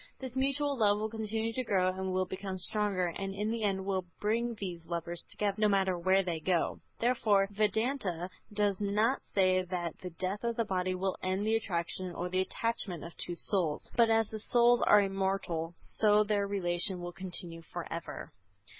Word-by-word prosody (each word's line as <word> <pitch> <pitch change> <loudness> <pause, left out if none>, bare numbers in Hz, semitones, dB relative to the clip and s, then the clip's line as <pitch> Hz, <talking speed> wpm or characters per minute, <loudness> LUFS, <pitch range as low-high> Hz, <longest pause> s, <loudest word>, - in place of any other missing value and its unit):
This 260 -2 -7
mutual 275 +1 +1
love 205 -2 +4
will 215 +1 -2
continue 220 0 -2
to 255 - -1
grow 185 -5 +2
and 190 0 -3
will 185 0 +1
become 190 +1 -5
stronger, 190 -1 0
and 195 0 -4
in 210 +2 -1
the 230 0 -2
end 195 -2 0
will 190 -2 -1
bring 230 +3 0
these 180 -5 -5
lovers 170 0 -3
together, 205 -1 -1
no 215 - +6
matter 190 -2 +2
where 190 +3 +3
they 170 -3 -2
go. 175 +1 0 0.2
Therefore, 220 -5 +3
Vedanta 205 -4 0 0.2
does 205 -1 +1
not 210 +6 +2
say 185 -1 +4
that 175 -2 -4
the 185 - -6
death 185 +5 -4
of 235 0 0
the 230 -1 0
body 185 -1 0
will 190 +1 -1
end 190 +2 -1
the 220 +1 +2
attraction 180 -3 -1
or 180 +1 -3
the 185 +1 +1
attachment 195 -4 -2
of 170 - -9
two 175 - -4
souls; 170 -5 0
but 230 -1 +5
as 225 -1 +3
the 220 - -4
souls 240 +2 +4
are 210 -1 +6
immortal 190 -4 -1
so 210 -1 +3
their 205 -1 0
relation 180 -1 +1
will 175 0 -6
continue 175 -2 -6
forever. 170 0 -6
195 Hz, 185 wpm, -31 LUFS, 180-215 Hz, 0.2 s, no